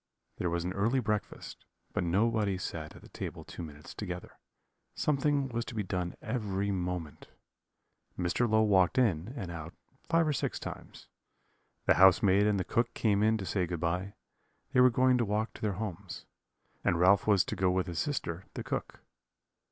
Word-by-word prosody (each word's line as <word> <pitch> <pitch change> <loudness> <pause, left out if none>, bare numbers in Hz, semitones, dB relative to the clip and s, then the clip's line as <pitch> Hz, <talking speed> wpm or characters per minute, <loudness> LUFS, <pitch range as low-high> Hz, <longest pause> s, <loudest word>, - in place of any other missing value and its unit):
There 90 - 0
was 85 0 -1
an 90 +1 -2
early 115 +7 +1
breakfast, 105 -3 -3 0.3
but - - 0
nobody 100 +2 +1
sat 80 -4 -5
at - - -14
the - - -14
table - - -6
two - - -8
minutes 75 -2 -9
together; 90 0 -7 0.6
something 145 -1 +1
was 120 -1 -2
to - - -8
be 105 - -1
done 90 -2 -3
every 100 -4 -1
moment. 90 -5 -4 0.9
Mr. 90 +7 +1
Low 110 0 +4
walked 100 +2 +3
in 105 -5 +2
and 90 -3 -5
out 85 0 -7 0.3
five 165 -1 +3
or 150 - +2
six 130 - -2
times. - - -9 0.8
The - - +6
housemaid 95 +2 +6
and 105 -2 +2
the - - 0
cook 120 +4 0
came 105 -3 +2
in 110 +1 +3
to 95 - -5
say 90 -2 0
good 85 -1 -3
bye; 90 +4 -2 0.6
they 125 - +4
were 125 - +8
going 125 +1 +3
to - - +3
walk 110 +1 -1
to - - -13
their 105 -2 0
homes; 100 -3 -6 0.6
and 85 - +2
Ralph 95 +4 +5
was 100 -4 +4
to - - -3
go 95 -1 +2
with 90 0 +1
his 85 -3 -4
sister, 95 - -2
the - - -4
cook. - - -4
100 Hz, 185 wpm, -31 LUFS, 90-115 Hz, 0.9 s, were